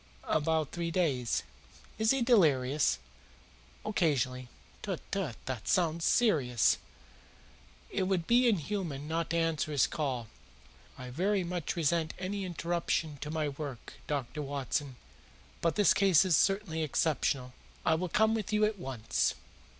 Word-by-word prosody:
"About 155 Hz, -1 st, 0 dB
three 170 Hz, -1 st, -3 dB
days." 145 Hz, -9 st, 0 dB, 0.6 s
"Is 220 Hz, 0 st, +2 dB
he 270 Hz, -1 st, +3 dB
delirious?" 150 Hz, -, +3 dB, 0.9 s
"Occasionally." 130 Hz, -, 0 dB, 0.3 s
"Tut, 190 Hz, -5 st, -3 dB
tut! 185 Hz, -, -2 dB
This 130 Hz, -3 st, -3 dB
sounds 170 Hz, -2 st, +1 dB
serious. 135 Hz, -, +3 dB, 1.1 s
It 185 Hz, -, 0 dB
would 185 Hz, -4 st, 0 dB
be 245 Hz, +4 st, +4 dB
inhuman 165 Hz, -6 st, -2 dB
not 165 Hz, +1 st, -1 dB
to 170 Hz, -, 0 dB
answer 165 Hz, -2 st, 0 dB
his 145 Hz, -3 st, +4 dB
call. 130 Hz, -7 st, -2 dB, 0.7 s
I 125 Hz, -1 st, -8 dB
very 190 Hz, +7 st, +1 dB
much 175 Hz, -2 st, -3 dB
resent 165 Hz, -1 st, 0 dB
any 195 Hz, +1 st, -3 dB
interruption 170 Hz, -3 st, -1 dB
to 150 Hz, +2 st, -6 dB
my 155 Hz, -1 st, -1 dB
work, 140 Hz, -4 st, -7 dB
Dr. 145 Hz, +1 st, -3 dB
Watson, 140 Hz, -1 st, -3 dB, 0.7 s
but 165 Hz, -2 st, +1 dB
this 205 Hz, -, +5 dB
case 190 Hz, -3 st, +5 dB
is 180 Hz, -3 st, +4 dB
certainly 195 Hz, -4 st, +1 dB
exceptional. 140 Hz, -4 st, 0 dB, 0.3 s
I 160 Hz, -, +4 dB
will 175 Hz, +3 st, -1 dB
come 220 Hz, +5 st, +3 dB
with 220 Hz, -2 st, -2 dB
you 210 Hz, 0 st, +3 dB
at 210 Hz, -2 st, -2 dB
once." 130 Hz, -9 st, -1 dB
160 Hz, 135 wpm, -31 LUFS, 140-190 Hz, 1.1 s, this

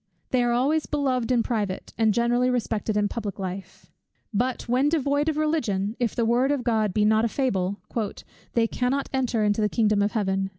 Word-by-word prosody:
They 255 Hz, -, +3 dB
are 240 Hz, 0 st, +2 dB
always 280 Hz, +6 st, +1 dB
beloved 260 Hz, -5 st, 0 dB
in 240 Hz, -2 st, +3 dB
private, 205 Hz, -6 st, -3 dB
and 220 Hz, -1 st, +3 dB
generally 240 Hz, +3 st, +2 dB
respected 220 Hz, -3 st, -1 dB
in 205 Hz, 0 st, +2 dB
public 205 Hz, -2 st, -5 dB
life. 190 Hz, 0 st, -7 dB, 0.4 s
But 245 Hz, +4 st, 0 dB
when 255 Hz, +4 st, +2 dB
devoid 290 Hz, -1 st, +1 dB
of 305 Hz, -, -2 dB
Religion, 230 Hz, -10 st, 0 dB
if 240 Hz, -3 st, -1 dB
the 235 Hz, -, +1 dB
word 245 Hz, +4 st, +2 dB
of 280 Hz, -4 st, -1 dB
God 220 Hz, -4 st, +1 dB
be 210 Hz, +3 st, +2 dB
not 220 Hz, +1 st, +3 dB
a -, -, +3 dB
fable, 200 Hz, -7 st, -1 dB, 0.8 s
"they 230 Hz, -1 st, +3 dB
cannot 255 Hz, +4 st, -1 dB
enter 250 Hz, -4 st, 0 dB
into 210 Hz, +1 st, +1 dB
the 210 Hz, -, +2 dB
kingdom 210 Hz, -2 st, +2 dB
of 205 Hz, +1 st, 0 dB
Heaven." 195 Hz, -3 st, 0 dB
235 Hz, 195 wpm, -25 LUFS, 210-255 Hz, 0.8 s, They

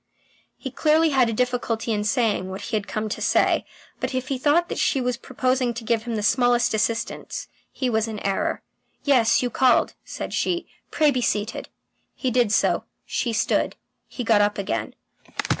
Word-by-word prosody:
He -, -, -6 dB
clearly 315 Hz, +1 st, +3 dB
had 260 Hz, -4 st, +4 dB
a -, -, 0 dB
difficulty 240 Hz, -1 st, -1 dB
in 210 Hz, -1 st, -1 dB
saying 215 Hz, -5 st, +1 dB
what 190 Hz, +1 st, -6 dB
he 230 Hz, -, -3 dB
had 210 Hz, -1 st, -2 dB
come 215 Hz, 0 st, -2 dB
to -, -, -4 dB
say, -, -, +2 dB, 0.3 s
but -, -, -3 dB
if 255 Hz, 0 st, -2 dB
he 270 Hz, -2 st, -1 dB
thought 310 Hz, +6 st, +3 dB
that -, -, -4 dB
she 275 Hz, -, +2 dB
was 250 Hz, -1 st, 0 dB
proposing 255 Hz, -1 st, -1 dB
to 240 Hz, -, -6 dB
give 225 Hz, 0 st, 0 dB
him 235 Hz, -2 st, -2 dB
the 210 Hz, -, -2 dB
smallest 245 Hz, +3 st, +3 dB
assistance, 225 Hz, +1 st, -2 dB, 0.2 s
he 260 Hz, -, -2 dB
was 220 Hz, -2 st, +1 dB
in 220 Hz, -1 st, -5 dB
error. 195 Hz, -1 st, -1 dB, 0.4 s
"Yes, 255 Hz, -5 st, +4 dB
you 245 Hz, -, -1 dB
called," 255 Hz, -1 st, +3 dB
said -, -, -6 dB
she. 350 Hz, -1 st, 0 dB, 0.2 s
"Pray 305 Hz, -2 st, +3 dB
be 255 Hz, -2 st, -1 dB
seated." 215 Hz, 0 st, -1 dB, 0.5 s
He 255 Hz, -, -1 dB
did 240 Hz, -3 st, +2 dB
so; -, -, +2 dB, 0.2 s
she 235 Hz, -, -1 dB
stood; 220 Hz, -, +1 dB, 0.3 s
he 250 Hz, -, -5 dB
got 225 Hz, -3 st, +4 dB
up 205 Hz, 0 st, +1 dB
again. 200 Hz, 0 st, -3 dB
240 Hz, 185 wpm, -24 LUFS, 220-255 Hz, 0.5 s, had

